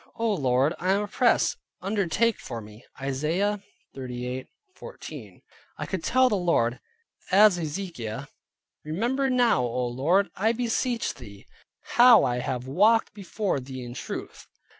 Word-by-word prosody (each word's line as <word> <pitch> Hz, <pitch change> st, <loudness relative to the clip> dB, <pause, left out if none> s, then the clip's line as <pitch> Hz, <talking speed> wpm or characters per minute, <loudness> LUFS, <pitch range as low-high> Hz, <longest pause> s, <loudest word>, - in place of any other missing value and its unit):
Oh, 225 Hz, -1 st, +1 dB
Lord, 135 Hz, -2 st, +2 dB
I 185 Hz, +2 st, +2 dB
am 200 Hz, +1 st, +1 dB
oppressed; 230 Hz, +3 st, +2 dB, 0.2 s
undertake 200 Hz, +3 st, 0 dB
for 115 Hz, -, -6 dB
me" 105 Hz, +1 st, -13 dB, 0.2 s
(Isaiah 160 Hz, +10 st, -1 dB, 0.3 s
38.14). 130 Hz, -, -8 dB, 0.3 s
I -, -, -4 dB
could 190 Hz, -4 st, -4 dB
tell 255 Hz, 0 st, +4 dB
the 240 Hz, -, 0 dB
Lord, 165 Hz, -10 st, +1 dB, 0.5 s
as 200 Hz, -1 st, +6 dB
Hezekiah, 155 Hz, -, -5 dB, 0.6 s
"Remember 240 Hz, -, -1 dB
now 245 Hz, -, +3 dB
O 125 Hz, +1 st, -1 dB
Lord, 150 Hz, +12 st, +1 dB
I 220 Hz, +4 st, +2 dB
beseech 240 Hz, 0 st, -1 dB
thee, 105 Hz, -5 st, -13 dB, 0.5 s
how 240 Hz, -1 st, +8 dB
I 125 Hz, -1 st, 0 dB
have 125 Hz, 0 st, -3 dB
walked 210 Hz, +12 st, +3 dB
before 200 Hz, -4 st, -2 dB
thee 130 Hz, 0 st, -8 dB
in 120 Hz, 0 st, -7 dB
truth." -, -, -7 dB
175 Hz, 130 wpm, -26 LUFS, -, 0.6 s, how